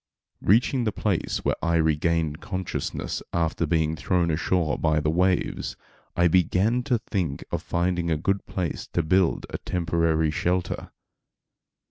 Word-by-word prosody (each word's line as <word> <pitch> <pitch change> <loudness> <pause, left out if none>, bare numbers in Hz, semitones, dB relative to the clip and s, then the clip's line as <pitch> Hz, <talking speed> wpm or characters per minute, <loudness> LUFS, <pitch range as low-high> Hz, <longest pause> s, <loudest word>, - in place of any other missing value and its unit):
Reaching 120 +5 +3
the 110 - 0
place 100 -4 -1
where - - +1
I 85 0 +2
regained 80 0 +1
consciousness 95 -4 -3
after 85 -1 0
being 80 0 +1
thrown 85 +2 +1
ashore 85 0 0
by 80 -1 +2
the 75 0 0
waves. 90 +2 0 0.4
I 85 0 +4
began 95 +7 +2
to 125 -4 +2
think 90 -10 -3
of - - -1
finding 85 0 0
a 80 - +1
good 95 +6 -1
place 90 -4 -3
to 85 - +1
build 90 +2 +2
a - - -4
temporary 80 -2 +1
shelter. 90 +3 -1
85 Hz, 140 wpm, -25 LUFS, 80-95 Hz, 0.4 s, I